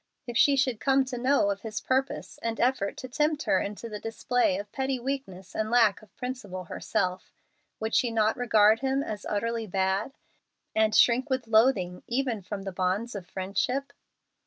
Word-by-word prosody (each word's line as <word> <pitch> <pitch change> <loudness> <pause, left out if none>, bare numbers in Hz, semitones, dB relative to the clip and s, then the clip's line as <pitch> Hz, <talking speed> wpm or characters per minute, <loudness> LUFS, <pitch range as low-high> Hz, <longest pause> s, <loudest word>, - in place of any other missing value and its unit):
If 240 - -6
she 280 +4 +5
should 255 -5 +1
come 270 -1 +3
to 255 -1 -5
know 255 -5 +3
of 200 0 -4
his 220 -1 -4
purpose 265 +1 -2
and 230 0 -3
effort 240 -5 +1
to 255 - -6
tempt 295 +3 0
her 190 - +2
into 210 +3 -5
the 210 -2 -6
display 225 -2 0
of 200 +1 -7
petty 265 -1 -1
weakness 235 -8 -5
and 215 0 -1
lack 225 -4 +4
of 215 - -20
principle 245 -8 -5
herself, 180 +2 -2 0.5
would 220 +1 -3
she 245 - +3
not 220 -1 +2
regard 220 -3 +4
him 270 +2 0
as 210 -5 -5
"utterly 230 +2 -1
bad," 190 +5 0 0.6
and 220 0 +2
shrink 250 +4 +4
with 260 -2 -1
loathing 220 -6 +3
even 240 -3 -1
from 195 +1 -6
the 195 - -4
bonds 190 +6 -1
of 195 -4 -7
friendship? 205 +10 -2
225 Hz, 180 wpm, -28 LUFS, 200-255 Hz, 0.6 s, she